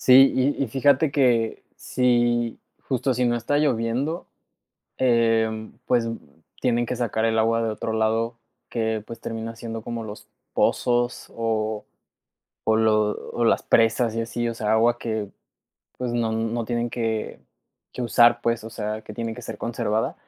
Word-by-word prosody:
Sí, 130 Hz, +1 st, +7 dB
y 140 Hz, +2 st, +1 dB
y -, -, +1 dB
fíjate 140 Hz, +4 st, +3 dB
que, 120 Hz, -5 st, +2 dB
si, 120 Hz, -2 st, +1 dB, 0.3 s
justo, 130 Hz, -1 st, +1 dB
si 125 Hz, +1 st, +1 dB
no 120 Hz, 0 st, +2 dB
está 145 Hz, +5 st, 0 dB
lloviendo, 135 Hz, +3 st, 0 dB, 0.7 s
em, 115 Hz, -3 st, +2 dB
pues, 120 Hz, -2 st, +2 dB, 0.5 s
tienen 120 Hz, -1 st, +1 dB
que 125 Hz, -, -3 dB
sacar 115 Hz, -2 st, -1 dB
el 110 Hz, 0 st, +2 dB
agua 115 Hz, +1 st, +2 dB
de 115 Hz, -, 0 dB
otro 110 Hz, +1 st, -3 dB
lado 110 Hz, +1 st, 0 dB, 0.3 s
que, 110 Hz, -2 st, -1 dB
pues, 115 Hz, -, -9 dB
termina 115 Hz, 0 st, -5 dB
siendo 115 Hz, -1 st, -6 dB
como 115 Hz, -1 st, -5 dB
los 105 Hz, -1 st, -9 dB, 0.3 s
pozos, 120 Hz, 0 st, +1 dB
o 110 Hz, -2 st, -1 dB, 0.9 s
o 110 Hz, -, +5 dB
lo 110 Hz, -1 st, +3 dB, 0.2 s
o 120 Hz, -, 0 dB
las -, -, +3 dB
presas 115 Hz, 0 st, +3 dB
y 115 Hz, -, 0 dB
así, 115 Hz, +1 st, -2 dB
o 115 Hz, -, -3 dB
sea, 110 Hz, -1 st, 0 dB
agua 120 Hz, +2 st, +3 dB
que, 110 Hz, -4 st, -3 dB, 0.7 s
pues, 125 Hz, -1 st, -2 dB
no 115 Hz, -2 st, 0 dB
no 115 Hz, +1 st, -1 dB
tienen 120 Hz, +1 st, -1 dB
que 115 Hz, -2 st, -2 dB, 0.5 s
que 125 Hz, -, -4 dB
usar 120 Hz, 0 st, +5 dB
pues, 115 Hz, -1 st, 0 dB
o 115 Hz, -, -7 dB
sea, 110 Hz, -1 st, -4 dB
que 105 Hz, -, -10 dB
tiene 115 Hz, 0 st, -3 dB
que -, -, -9 dB
ser -, -, -6 dB
conservada, 115 Hz, -2 st, -1 dB
115 Hz, 165 wpm, -24 LUFS, 110-120 Hz, 0.9 s, Sí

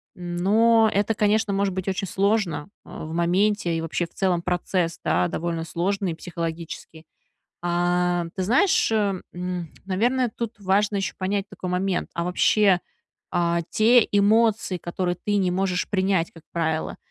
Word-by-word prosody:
Но 215 Hz, +6 st, +3 dB
это, 205 Hz, +3 st, +1 dB
конечно, 210 Hz, -1 st, +1 dB
может 195 Hz, -1 st, 0 dB
быть 190 Hz, 0 st, -4 dB
очень 195 Hz, 0 st, -1 dB
сложно, 195 Hz, -5 st, 0 dB, 0.2 s
э, -, -, -15 dB, 0.2 s
в 160 Hz, -, -7 dB
моменте, 175 Hz, 0 st, +1 dB
и -, -, -2 dB
вообще 165 Hz, +1 st, -2 dB
в -, -, -18 dB
целом 180 Hz, -3 st, 0 dB
процесс, 175 Hz, -1 st, -1 dB
да, 90 Hz, 0 st, +2 dB
довольно 165 Hz, 0 st, -3 dB
сложный 175 Hz, +1 st, -2 dB
психологически. 165 Hz, -1 st, -6 dB, 0.6 s
А, 175 Hz, 0 st, +1 dB
ты 190 Hz, -, -1 dB
знаешь, 260 Hz, -, +3 dB
э, 205 Hz, -4 st, +1 dB
м, 180 Hz, -2 st, -4 dB, 0.2 s
наверное, 240 Hz, +6 st, +1 dB
тут 230 Hz, -2 st, -5 dB
важно 200 Hz, +2 st, +1 dB
ещё 195 Hz, -5 st, -2 dB
понять 195 Hz, +1 st, -1 dB
такой 185 Hz, -, -6 dB
момент, 180 Hz, +1 st, -1 dB
а 170 Hz, -, -2 dB
вообще, 185 Hz, +1 st, +3 dB, 0.5 s
а, 170 Hz, -1 st, +1 dB
те 230 Hz, +1 st, +5 dB
эмоции, 210 Hz, -1 st, +3 dB
которые 175 Hz, +1 st, -2 dB
ты 205 Hz, -1 st, +1 dB
не 185 Hz, -2 st, +2 dB
можешь 185 Hz, -1 st, -1 dB
принять, 190 Hz, -3 st, +1 dB
как 165 Hz, -, -16 dB
правило, 160 Hz, -2 st, -2 dB
185 Hz, 150 wpm, -24 LUFS, 175-205 Hz, 0.6 s, те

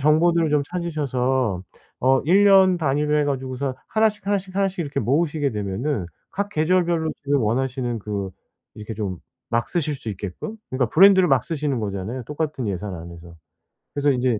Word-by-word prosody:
정보들을 160 Hz, +3 st, +3 dB
좀 150 Hz, -1 st, +3 dB
찾으셔서 130 Hz, -, -1 dB, 0.4 s
어 130 Hz, +1 st, +4 dB
1 195 Hz, +5 st, +5 dB
년 190 Hz, -2 st, +6 dB
단위로 150 Hz, 0 st, +1 dB
해 150 Hz, -, +2 dB
가지고서 130 Hz, -1 st, -2 dB
1 220 Hz, 0 st, +3 dB
씩 210 Hz, -, -15 dB
1 205 Hz, 0 st, +2 dB
씩 190 Hz, 0 st, -10 dB
1 200 Hz, -, +3 dB
씩 185 Hz, -1 st, -6 dB
이렇게 140 Hz, -3 st, -3 dB
모으시게 145 Hz, +1 st, +1 dB
되면은 105 Hz, -, -2 dB, 0.2 s
각 200 Hz, +1 st, -2 dB
계절별로 170 Hz, -1 st, +1 dB
지금 140 Hz, 0 st, +1 dB
원하시는 125 Hz, +1 st, -1 dB
그 100 Hz, -2 st, -4 dB, 0.4 s
이렇게 105 Hz, +1 st, -7 dB
좀 100 Hz, -5 st, -4 dB, 0.3 s
막 115 Hz, 0 st, +1 dB
쓰실 155 Hz, -4 st, -1 dB
수 115 Hz, -, -8 dB
있게끔 100 Hz, -, -6 dB
그러니까 130 Hz, -2 st, 0 dB
브랜드를 190 Hz, +1 st, +7 dB
막 135 Hz, -4 st, +3 dB
쓰시는 150 Hz, -5 st, -2 dB
거잖아요, 105 Hz, +5 st, -4 dB
똑같은 150 Hz, -4 st, -3 dB
예산 95 Hz, 0 st, -4 dB
안에서. 85 Hz, 0 st, -10 dB, 0.6 s
그래서 145 Hz, 0 st, +1 dB
인제 125 Hz, -3 st, +1 dB
140 Hz, 350 characters per minute, -23 LUFS, 115-165 Hz, 0.6 s, 브랜드를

